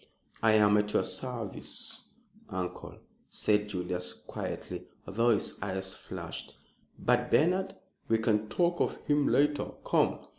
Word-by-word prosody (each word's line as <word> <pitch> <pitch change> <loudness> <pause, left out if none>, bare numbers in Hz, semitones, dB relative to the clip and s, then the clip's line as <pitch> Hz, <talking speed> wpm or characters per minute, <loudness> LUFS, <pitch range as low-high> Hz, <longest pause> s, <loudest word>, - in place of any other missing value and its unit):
"I 110 -1 +5
am 105 -1 +6
at 105 0 0
your - - +3
service, 120 -6 -4 0.5
uncle," 90 -1 -4 0.3
said 105 0 +2
Julius, 90 -1 -1
quietly, - - -6 0.2
although 115 +4 +2
his 110 -3 +2
eyes 95 -1 -2
flashed. - - -7 0.4
"But 125 0 +2
Bernard?" 185 +5 +3 0.3
"We 115 - +4
can 110 -1 +1
talk 175 -1 +2
of - - +1
him 145 -1 +3
later. 145 0 +2
Come!" - - +2
110 Hz, 125 wpm, -31 LUFS, 100-130 Hz, 0.5 s, am